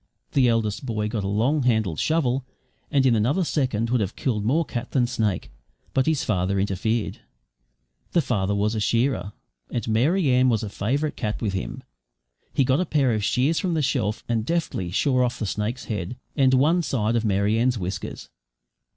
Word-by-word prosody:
The 130 -3 +4
eldest 110 -2 0
boy 105 -4 -2
got 105 -2 -2
a - - -2
long 120 +9 +1
handled 110 - +1
shovel, 140 -5 +1 0.5
and 140 -3 +2
in 125 -3 +4
another 125 - +2
second 125 -8 0
would 125 -2 +2
have 100 0 -2
killed 110 -6 -1
more 150 +10 +2
cat 120 -4 -5
than 130 -3 +3
snake; 110 -7 -1 0.4
but 130 +1 +2
his 160 -3 +1
father 95 -1 0
interfered. 105 +3 -1 0.9
The 170 - +4
father 100 -7 0
was 105 +2 +1
a 110 - -1
shearer, 115 -1 0 0.4
and 120 -2 -3
Mary 140 - +2
Ann 125 +1 +4
was 110 -3 +1
a 105 - -3
favourite 140 +10 -1
cat 105 -3 -3
with 105 -4 -2
him. 95 - -4 0.7
He 135 - +2
got 130 +3 +2
a 180 - +1
pair 135 -6 +2
of 105 -1 -1
shears 140 +10 +2
from 180 -4 -1
the 155 - +1
shelf 115 -6 -1
and 115 -2 0
deftly 160 - -1
shore 130 - +2
off 125 0 -1
the 110 - -3
snake's 105 +5 -3
head, 105 +2 -4 0.2
and 130 -2 +4
one 155 +7 +3
side 120 -7 0
of 115 - +1
Mary 105 +1 +1
Ann's 125 +1 +2
whiskers. 95 -1 -5
120 Hz, 190 wpm, -24 LUFS, 105-135 Hz, 0.9 s, The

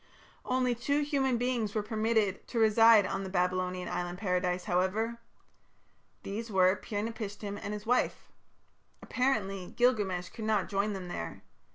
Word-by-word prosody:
Only 255 -1 +1
two 280 +5 0
human 270 -4 +1
beings 235 -4 -1
were 215 - 0
permitted 215 -2 0
to 240 - -5
reside 225 -1 +6
on 195 +1 -2
the 190 - -5
Babylonian 180 0 -1
island 175 0 -3
paradise, 180 -2 0
however. 200 +7 0 1.0
These 225 +4 -5
were 185 -1 +4
Pir 205 +1 -4
napishtim 205 -2 -5
and 200 - -4
his 210 0 -5
wife. 245 +2 0 0.7
Apparently 195 -8 -1
Gilgamesh 205 -8 +1
could 220 - -7
not 215 -4 +1
join 200 +1 0
them 190 -2 -6
there. 85 - -6
210 Hz, 145 wpm, -30 LUFS, 185-230 Hz, 1.0 s, reside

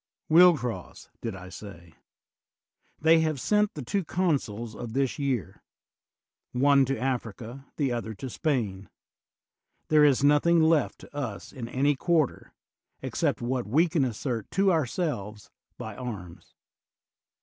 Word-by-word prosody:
Will 175 +1 +7
cross, 115 -9 -6
did 115 -4 -4
I 90 0 -10
say? 85 -3 -11 1.1
They 160 +1 +5
have 155 -3 0
sent 210 +7 +1
the 145 - -5
two 195 +11 -1
consuls 130 - -1
of 115 -2 -7
this 135 +1 0
year, 130 - -2 0.9
one 140 +2 +4
to 135 +1 -1
Africa, 125 0 -4
the 140 -4 0
other 115 -2 -3
to 130 - -6
Spain: 115 - -2 1.0
there 155 -1 +6
is 140 -2 +4
nothing 150 +4 +4
left 160 -2 +3
to - - -15
us 115 -10 -5
in 120 -3 -6
any 140 +4 +2
quarter, 160 0 0 0.5
except - - -1
what 125 -1 -2
we 155 +11 +3
can 160 -4 +1
assert 120 -2 -3
to 195 0 +2
our 160 -6 +1
selves 105 - -4 0.3
by 110 -2 -7
arms. 100 -9 -8
130 Hz, 140 wpm, -27 LUFS, 110-155 Hz, 1.1 s, Will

